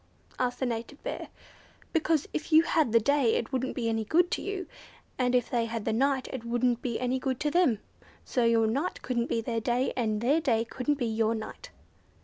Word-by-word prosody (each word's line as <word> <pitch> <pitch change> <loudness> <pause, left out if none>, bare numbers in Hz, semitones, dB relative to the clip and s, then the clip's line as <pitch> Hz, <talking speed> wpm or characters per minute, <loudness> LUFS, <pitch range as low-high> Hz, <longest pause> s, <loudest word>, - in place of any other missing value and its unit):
asked 250 -1 -1
the 260 - 0
native 240 +4 -4
Bear. - - -4 0.7
"Because 320 -2 +1
if 315 - -4
you 315 +1 +7
had 315 -7 +2
the 230 - +6
day 265 0 +2
it 235 - -2
wouldn't 260 0 -1
be 235 -3 -1
any 225 -1 0
good 340 +10 +2
to - - -1
you, 390 -2 -4 0.5
and 250 0 +2
if 245 -2 +2
they 235 -3 +1
had 230 -2 -4
the 225 - +1
night 265 +2 +1
it 255 -3 -5
wouldn't 240 0 +1
be 235 -3 -2
any 255 +1 0
good 260 -1 -2
to 295 - +1
them. 340 -9 +3 0.5
So 250 - 0
your 230 -1 +4
night 275 +11 -1
couldn't 240 -2 -1
be 230 - 0
their 230 0 -2
day, 245 +3 0
and 220 -4 0
their 280 +8 +2
day 230 -6 +1
couldn't 265 +5 -1
be 250 - -1
your 225 0 +1
night." 220 - -7
245 Hz, 215 wpm, -29 LUFS, 230-280 Hz, 0.7 s, you